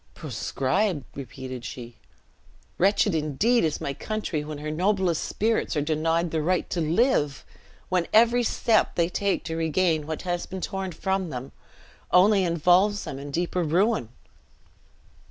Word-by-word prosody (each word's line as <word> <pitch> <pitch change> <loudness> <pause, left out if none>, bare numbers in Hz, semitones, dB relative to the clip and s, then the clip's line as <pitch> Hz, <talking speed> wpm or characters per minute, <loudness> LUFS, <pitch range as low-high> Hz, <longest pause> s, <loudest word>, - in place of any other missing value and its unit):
"Proscribed!" 160 +3 -1
repeated 130 -1 -7
she; 120 -2 -8 0.8
"wretched 200 +1 +3
indeed 160 - +2
is 155 -2 0
my 140 - -3
country 210 -5 -3
when 150 0 -6
her 150 +1 -5
noblest 185 0 +1
spirits 220 -4 0
are 150 - +1
denied 165 +2 0
the 160 - 0
right 180 +3 0
to 175 - -1
live! 160 - +1 0.4
when 180 -2 +1
every 235 +2 +5
step 225 -1 +1
they 170 0 +2
take 200 +2 -1
to 160 - -4
regain 160 -1 +1
what 160 -1 -4
has 175 -1 -2
been 190 - -6
torn 190 0 -4
from 190 0 -2
them, 130 -1 -6 0.6
only 195 +2 +5
involves 180 +4 +3
them 135 - -6
in 145 +1 -7
deeper 175 +4 -1
ruin!" 175 - +1
170 Hz, 145 wpm, -25 LUFS, 150-195 Hz, 0.8 s, every